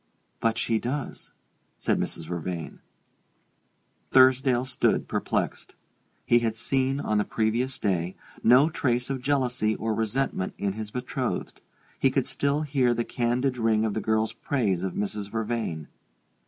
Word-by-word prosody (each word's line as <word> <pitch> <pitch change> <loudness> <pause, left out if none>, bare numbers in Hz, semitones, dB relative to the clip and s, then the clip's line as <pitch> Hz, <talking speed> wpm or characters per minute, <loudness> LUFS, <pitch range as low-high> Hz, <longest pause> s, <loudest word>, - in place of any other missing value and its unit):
"But 115 0 +1
she 115 -1 +1
does," 135 +4 -4 0.5
said - - 0
Mrs. 80 - -3
Vervain. 85 0 -5 1.3
Thursdale 130 -1 +5
stood 130 -1 +1
perplexed. - - -2 0.5
He 120 - +5
had 115 -2 -1
seen, 135 +3 0
on 110 -6 +1
the - - +3
previous 115 +5 0
day, 90 -3 -1 0.3
no 125 +6 +7
trace 125 -2 0
of 135 -2 -3
jealousy 125 -5 +1
or 110 0 -1
resentment 110 -2 -1
in 100 -1 -1
his 110 0 -5
betrothed: 125 +3 -3 0.4
he - - +4
could - - 0
still 140 +2 0
hear 135 -5 +2
the 120 - -1
candid 125 +2 0
ring 110 -1 +2
of 110 - -1
the 110 - -2
girl's 110 +1 +1
praise 110 -7 0
of 95 -1 -3
Mrs. 105 0 -3
Vervain. 110 -8 -3
115 Hz, 140 wpm, -27 LUFS, 105-130 Hz, 1.3 s, no